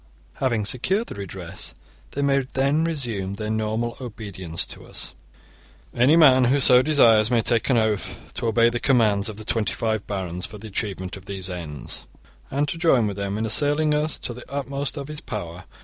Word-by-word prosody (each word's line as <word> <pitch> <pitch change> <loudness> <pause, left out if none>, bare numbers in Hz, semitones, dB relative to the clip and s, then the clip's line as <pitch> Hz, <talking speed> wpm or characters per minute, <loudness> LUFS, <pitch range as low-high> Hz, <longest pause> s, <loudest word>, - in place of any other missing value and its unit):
Having 115 -6 0
secured 190 - +1
the - - -5
redress, 95 -2 -7 0.4
they 140 - -1
may 140 -1 +3
then 140 +4 +2
resume 120 - -2
their 105 +1 -4
normal 110 +2 -1
obedience 100 -8 -5
to - - -7
us. - - -7 0.4
* 60 -1 -29
Any 130 +6 +4
man 130 -6 +7
who 135 +4 +3
so 125 -1 +7
desires 115 -7 +5
may 120 -2 +2
take 115 +3 +1
an 130 - +4
oath 110 -3 0 0.2
to 120 - -2
obey 115 +1 +4
the 120 - -2
commands 110 -6 +3
of 105 - -8
the 110 - -8
twenty 105 -5 0
five 110 -2 -2
barons 90 -3 -3
for 105 - -10
the 110 +1 -9
achievement 95 -2 -4
of 95 - -14
these 95 -2 -5
ends, 75 -7 -6 0.4
and 145 +2 0
to 165 - -3
join 135 -9 +4
with 100 -2 -3
them 100 0 -2
in 110 - -1
assailing 145 +7 +2
us 150 +1 0
to 120 - -5
the 125 +2 -12
utmost 140 0 -2
of 140 -1 -5
his 150 0 -5
power. 90 -4 -6
115 Hz, 195 wpm, -24 LUFS, 100-135 Hz, 0.4 s, man